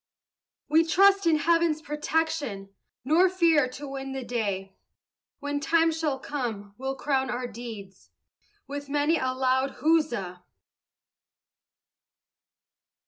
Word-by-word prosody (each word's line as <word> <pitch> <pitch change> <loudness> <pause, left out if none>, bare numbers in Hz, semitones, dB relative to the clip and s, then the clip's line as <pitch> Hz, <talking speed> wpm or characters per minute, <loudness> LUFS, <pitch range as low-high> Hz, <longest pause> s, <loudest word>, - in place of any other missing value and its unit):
We 315 +2 +4
trust 390 +3 +4
in 325 - +5
Heaven's 330 0 +2
protection, 300 -9 -2 0.3
Nor 335 +7 +4
fear 330 -7 +3
to 285 +3 -8
win 270 0 -6
the 265 -1 -4
day; 200 -6 -3 0.6
When 285 0 -2
time 325 +2 +3
shall 315 -4 -1
come 230 -8 -5
we'll 265 +1 -3
crown 265 -1 0
our 250 +1 -3
deeds 220 -5 -9 0.6
With 285 0 -7
many 295 +3 +2
a 260 0 0
loud 260 +1 0
huzza! 240 - +1
280 Hz, 110 wpm, -27 LUFS, 245-320 Hz, 0.6 s, in